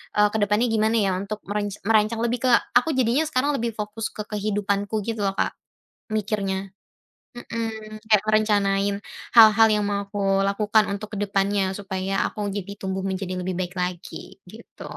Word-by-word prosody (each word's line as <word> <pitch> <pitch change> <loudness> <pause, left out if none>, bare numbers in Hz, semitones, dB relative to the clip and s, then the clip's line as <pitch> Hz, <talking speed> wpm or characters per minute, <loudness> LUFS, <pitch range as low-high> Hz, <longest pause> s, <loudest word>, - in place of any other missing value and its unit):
e - - 0
ke 220 - -1
depannya 210 +4 +2
gimana 220 0 +2
ya, 200 -4 +2
untuk 200 +2 -5
merenc 205 0 -3
merancang 220 +1 +3
lebih 240 +1 0
ke, 255 - +3 0.3
aku 275 +5 +1
jadinya 255 +3 +2
sekarang 285 -1 +1
lebih 235 -2 -1
fokus 210 +1 -4
ke 210 - -4
kehidupanku 205 0 -1
gitu 225 +1 -4
lho, 195 - -2
Kak, - - 0 0.6
mikirnya. 195 -2 -2 0.7
Mhm, 220 -2 -5
kayak 210 -2 +5
merencanain 205 -2 +2 0.4
hal-hal 225 0 +8
yang 210 -1 +2
mau 200 0 -1
aku 205 - -5 0.2
lakukan 210 +2 +2
untuk 210 +1 -5
ke - - -4
depannya, 200 -1 0
supaya 190 -1 -3
aku - - -9
jadi 200 0 -5
tumbuh 190 0 -3
menjadi 185 -1 -3
lebih 180 0 -3
baik 180 -1 -3
lagi 180 0 -5 0.2
gitu. 225 +2 -13
210 Hz, 165 wpm, -24 LUFS, 195-220 Hz, 0.7 s, hal-hal